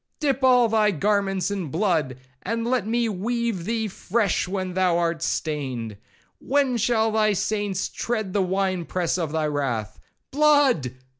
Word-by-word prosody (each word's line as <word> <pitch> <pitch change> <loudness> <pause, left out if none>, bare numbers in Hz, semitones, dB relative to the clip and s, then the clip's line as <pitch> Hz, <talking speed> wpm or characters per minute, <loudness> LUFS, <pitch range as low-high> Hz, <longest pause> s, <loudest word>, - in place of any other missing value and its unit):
—Dip 275 -3 0
all 250 -2 +5
thy 215 -1 +3
garments 200 +1 0
in 195 -5 -3
blood, 160 - 0 0.2
and 230 0 -2
let 240 -4 0
me 235 +1 +1
weave 225 -1 -2
thee 225 0 -1
fresh 205 -1 -1
when 185 -1 -3
thou 180 -2 +2
art 170 -2 -1
stained.—When 150 - -3
shall 225 0 +2
thy 215 -1 +2
saints 205 -1 -1
tread 220 -5 -3
the 200 - +2
winepress 185 -2 -1
of 160 -4 -2
thy 160 -1 0
wrath? 135 -8 -2 0.3
Blood! 285 - +3
200 Hz, 140 wpm, -24 LUFS, 170-230 Hz, 0.3 s, all